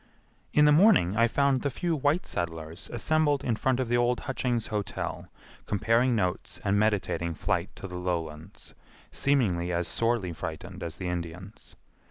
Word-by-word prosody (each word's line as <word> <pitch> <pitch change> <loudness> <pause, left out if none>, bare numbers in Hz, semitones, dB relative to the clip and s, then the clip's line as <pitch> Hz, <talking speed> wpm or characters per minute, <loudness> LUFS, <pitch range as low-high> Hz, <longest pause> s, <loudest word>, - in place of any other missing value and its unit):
In 150 - +5
the 150 - +6
morning 155 - +5
I 115 +1 +4
found 140 +1 +2
the 140 - 0
few 170 +5 -1
white 150 +4 +1
settlers 80 0 -5
assembled 145 +3 +1
in 120 - 0
front 130 +3 0
of 130 - 0
the 120 +1 +2
old 120 0 +1
Hutchings 125 -3 -1
Hotel 105 -2 -3 0.4
comparing 115 +5 +2
notes 90 -5 -2
and 100 +1 +2
meditating 100 -5 0
flight 95 -1 -1
to - - -9
the 90 -1 -6
lowlands, 85 -1 -5 0.4
seemingly 95 -12 +1
as 85 0 -1
sorely 115 -6 0
frightened 90 +3 -7
as 85 -2 -5
the 95 - -4
Indians. 90 +3 -6
105 Hz, 160 wpm, -28 LUFS, 90-130 Hz, 0.4 s, the